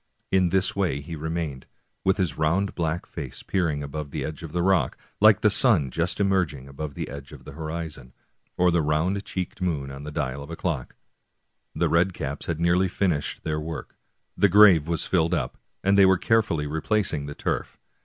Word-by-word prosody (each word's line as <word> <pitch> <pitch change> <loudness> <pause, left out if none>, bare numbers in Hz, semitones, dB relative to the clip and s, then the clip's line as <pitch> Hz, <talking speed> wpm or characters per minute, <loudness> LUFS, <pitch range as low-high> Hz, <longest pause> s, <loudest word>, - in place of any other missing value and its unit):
In 95 -2 +3
this 95 +1 +1
way 90 -9 0
he 80 +3 -7
remained, 80 -3 -4 0.4
with 95 0 +2
his 90 -7 0
round 90 +6 +1
black 85 0 -2
face 70 -7 -7
peering 80 -7 0
above 70 +1 -5
the - - -3
edge 75 -2 -6
of 80 -2 -7
the 85 +1 0
rock, 90 -8 +2 0.2
like 110 0 +6
the 105 - +5
sun 95 - +3
just 85 +7 -1
emerging 90 -9 0
above 70 +1 -6
the - - -4
edge 70 -1 -9
of - - -12
the - - -8
horizon, 80 -4 -6 0.5
or 90 0 +4
the 85 -1 +2
round 80 +7 0
cheeked 95 +1 -5
moon 75 -7 -1
on 70 +1 -8
the 75 - -6
dial 70 -3 -3
of 70 - -9
a 85 - -5
clock. 80 -8 -3 0.8
The - - +2
red 90 +2 +2
caps 70 -1 -5
had 85 -2 -2
nearly 85 +3 +3
finished 90 -5 -1
their 75 -1 -1
work, 80 +1 -6 0.4
the 100 - +4
grave 95 -6 +7
was 85 -2 0
filled 85 -1 +2
up, - - -3 0.2
and 100 +1 +4
they 100 -1 +7
were 95 -1 +5
carefully 105 -9 +1
replacing 80 0 -1
the 75 - -7
turf. - - -3
85 Hz, 195 wpm, -25 LUFS, 75-95 Hz, 0.8 s, grave